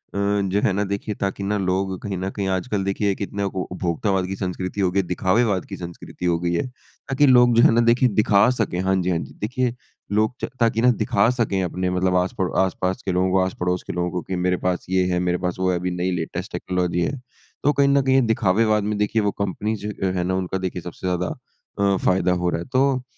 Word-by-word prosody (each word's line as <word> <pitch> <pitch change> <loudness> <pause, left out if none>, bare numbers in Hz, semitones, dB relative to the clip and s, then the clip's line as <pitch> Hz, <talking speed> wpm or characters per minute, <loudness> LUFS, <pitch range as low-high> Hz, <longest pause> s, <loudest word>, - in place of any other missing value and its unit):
जो 100 0 +1
है 100 - +2
ना - - +2
देखिए, 100 +1 -3
ताकि 100 0 -3
ना 105 +1 0
लोग 95 0 -1
कहीं 100 -2 -3
न 95 +1 -2
कहीं 100 0 -3
आजकल 100 +1 -2
देखिए 100 +1 0
कितने 100 0 -3
को 95 - -3
उपभोक्तावाद 90 +1 -1
की 95 - -4
संस्कृति 95 +1 -3
हो 95 - +3
गई 100 - +1
है - - +2
दिखावेवाद 95 +2 +1
की - - -7
संस्कृति 85 0 -8
हो 85 -1 +2
गई 85 0 -1
है। 85 - 0
ताकि 135 +2 -2
लोग 125 -2 +6
जो 115 - +6
हैं - - +7
ना 115 +1 +4
देखिए 125 +1 +3
दिखा 105 +2 +5
सकें 95 -5 -1
हाँ 95 0 +1
जी, 90 - -1
हाँ 90 - +1
जी - - -8
देखिए, 125 +3 -1 0.4
लोग 110 +3 +2
च - - -2
ताकि 115 -1 +2
ना 125 - +5
दिखा 100 +3 +3
सकें 100 -4 +1
अपने 90 +1 -2
मतलब 90 0 +1
आस-पड़ो 90 0 0
आस-पास 95 0 -2
के 95 - 0
लोगों 90 +1 +1
को 95 - +3
आस-पड़ोस 90 -1 -2
के - - -3
लोगों 90 0 -1
को 90 0 -2
कि 95 - -5
मेरे 90 0 +1
पास 90 -1 -1
ये 95 0 +2
है, 90 - +1
मेरे 90 0 0
पास 90 -1 -2
वो 95 0 +1
है 90 - 0
अभी 90 +1 -2
नई 90 +1 -1
लेटेस्ट 80 -2 -4
टेक्नोलॉजी 90 -1 -1
है। 135 +10 -1 0.4
तो 145 - +4
कहीं 140 0 +3
न 140 0 +4
कहीं 130 0 +2
ये 135 - +5
दिखावेवाद 105 +1 +2
में 105 0 -1
देखिए 105 +2 +1
वो 105 -1 +1
कंपनीज़ 105 +2 -2
जो 95 -2 -2
अ, - - -1
हैं 90 - 0
ना 95 +1 0
उनका 95 0 -2
देखिए 95 -2 -4
सबसे 90 +2 -6
ज़्यादा 90 0 0 0.5
अ, 100 -1 +3
फ़ायदा 90 -1 +2
हो 90 0 0
रहा 85 - -1
है। - - -7
तो, 130 -1 +2
95 Hz, 245 wpm, -22 LUFS, 90-105 Hz, 0.5 s, हैं